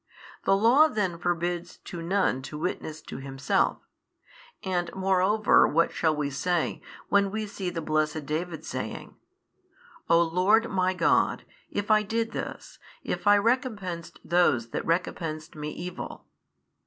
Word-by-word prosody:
The 195 - +5
Law 245 +9 +6
then 190 - -2
forbids 175 0 -2
to 175 - -8
none 175 -6 +1
to 150 +3 -7
witness 155 -1 -4
to - - -8
himself. 135 0 0 0.8
And 175 -2 -1
moreover 190 +2 +4
what 165 +2 +2
shall 160 -2 +1
we 145 -1 -2
say, 170 +5 -1 0.3
when 200 -1 +3
we 215 +2 -3
see 200 -3 -4
the 170 -2 -4
blessed 155 -1 0
David 160 +1 -3
saying, 130 -4 -5 0.9
O 165 0 +6
Lord 185 +7 +3
my 185 -1 +1
God, 170 -2 +2 0.2
if 205 +1 -2
I 215 0 +6
did 225 +2 -2
this, - - -6 0.2
if - - -3
I 205 - +8
recompensed 205 - -1
those 145 -10 +2
that - - -3
recompensed 165 -2 -2
me 150 0 -4
evil? 180 +3 -7
175 Hz, 140 wpm, -27 LUFS, 160-200 Hz, 0.9 s, I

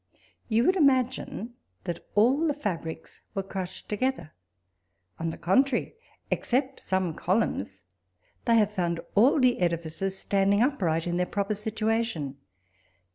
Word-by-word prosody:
You 225 +1 +3
would 370 +7 +4
imagine 260 - +1 0.3
that 170 -1 -4
all 260 +10 +4
the 295 - 0
fabrics 165 - -5
were 195 - -1
crushed 190 -1 -6
together; 215 -6 -2 0.9
on 165 - -1
the 160 - -6
contrary, 245 +8 +2 0.4
except 265 +2 0
some 185 -3 -1
columns, 155 - -1 0.6
they 230 -1 +5
have 210 -2 +3
found 175 -4 -1
all 250 +9 +5
the 255 -2 +3
edifices 170 +2 -1
standing 200 +2 +2
upright 175 - +1
in 175 0 -1
their 180 0 +1
proper 200 +1 -1
s'ituation. 215 - -1
205 Hz, 130 wpm, -27 LUFS, 175-245 Hz, 0.9 s, they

